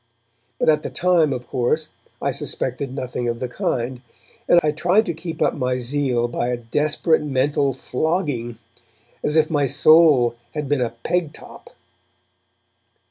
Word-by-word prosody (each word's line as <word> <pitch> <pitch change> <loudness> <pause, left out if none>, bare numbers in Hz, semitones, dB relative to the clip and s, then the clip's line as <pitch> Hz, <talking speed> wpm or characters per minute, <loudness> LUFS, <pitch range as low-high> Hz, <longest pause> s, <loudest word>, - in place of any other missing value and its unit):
But - - -1
at 155 -1 +4
the - - -5
time, 175 -4 +2
of 125 -2 -5
course, 155 +5 -1 0.3
I - - +1
suspected 130 +1 -2
nothing 125 -2 -3
of 115 0 -2
the 125 - -3
kind, 125 0 -3 0.5
and 175 - +7
I 150 - +2
tried 180 +8 +2
to 170 - -2
keep 165 +1 -4
up - - +2
my 125 -2 -1
zeal 125 -1 0
by 120 0 -2
a 125 0 -1
desperate 150 +7 +1
mental 140 0 0
flogging, 130 - -2 0.7
as 150 - +1
if 155 0 +3
my 145 -3 +2
soul 145 -3 +5 0.2
had 150 -2 -3
been 145 -1 0
a 120 - 0
peg 175 -4 -1
top. - - -14
140 Hz, 155 wpm, -21 LUFS, 125-155 Hz, 0.7 s, and